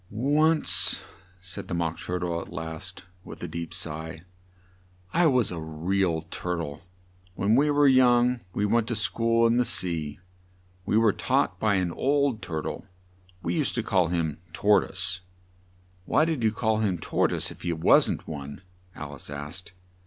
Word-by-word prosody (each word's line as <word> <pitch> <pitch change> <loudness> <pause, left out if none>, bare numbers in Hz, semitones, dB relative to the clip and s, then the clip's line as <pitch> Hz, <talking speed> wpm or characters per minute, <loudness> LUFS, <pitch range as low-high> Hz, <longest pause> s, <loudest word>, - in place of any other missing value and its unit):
"Once," 150 +8 +3 0.4
said 95 +1 -8
the 85 - -3
Mock 85 -1 -2
Tur 90 - -3
tle 85 -2 -2
at - - -11
last, 80 +3 -7 0.2
with - - -10
a - - -3
deep 85 -1 -6
sigh, 80 -2 -4 0.9
"I 175 -1 +4
was 125 -8 +2
a 85 - -4
re 80 +5 -1
al 80 -3 0
Tur 90 0 -3
tle. 75 -4 -5 0.5
When 100 +3 +1
we 145 +4 +3
were 145 0 +4
young 125 -1 +4
we 100 +3 -1
went 115 +2 +1
to 120 - -2
school 115 +2 +2
in 115 +1 +3
the 125 - +4
sea. 85 -9 0 0.7
We 105 - +2
were 110 -3 +4
taught 90 - 0
by 105 -1 +2
an 90 -2 0
old 140 0 +1
Tur 80 -2 -4
tle - - -6 0.6
we - - -1
used 155 -5 0
to 115 - -1
call 95 -5 +2
him 80 -3 -2
Tor 105 0 +4
toise 95 0 -2 0.4
" 90 0 -33
"Why 155 - +3
did 160 -6 -1
you 110 - +3
call 110 0 0
him 100 -5 0
Tor - - 0
toise, - - -2
if - - -13
he 85 - -2
wasn't 80 -1 +3
one?" 70 +2 -7 0.3
Al 75 0 -7
ice 70 - -10
asked. 75 +6 -7
95 Hz, 180 wpm, -26 LUFS, 85-115 Hz, 0.9 s, I